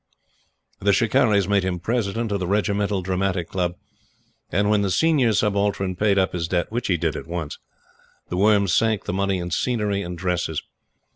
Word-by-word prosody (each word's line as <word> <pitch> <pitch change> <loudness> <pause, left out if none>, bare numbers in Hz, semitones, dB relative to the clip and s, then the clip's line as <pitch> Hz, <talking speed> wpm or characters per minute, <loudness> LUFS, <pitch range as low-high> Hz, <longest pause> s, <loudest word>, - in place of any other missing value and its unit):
The 100 +1 +2
"Shikarris" 110 -3 +3
made 100 -2 +2
him 90 -1 -2
President 115 +2 -1
of 100 - 0
the 90 - -2
Regimental 100 -1 0
Dramatic 95 -1 -1
Club; 90 -2 -1 0.8
and, 100 +4 +1
when 105 -1 +3
the 100 - 0
Senior 140 - +3
Subaltern 100 -2 0
paid 100 +1 +2
up 95 -1 +2
his 85 -2 -2
debt, 85 +2 -1
which 120 +2 -2
he 90 - +2
did - - -1
at - - -6
once, 85 -3 -5 0.7
The 90 - -3
Worm 100 0 +4
sank 110 +3 +2
the - - -3
money 100 0 0
in 90 0 -5
scenery 105 0 0
and 90 -2 -6
dresses. 90 -3 -2
100 Hz, 175 wpm, -23 LUFS, 90-105 Hz, 0.8 s, Worm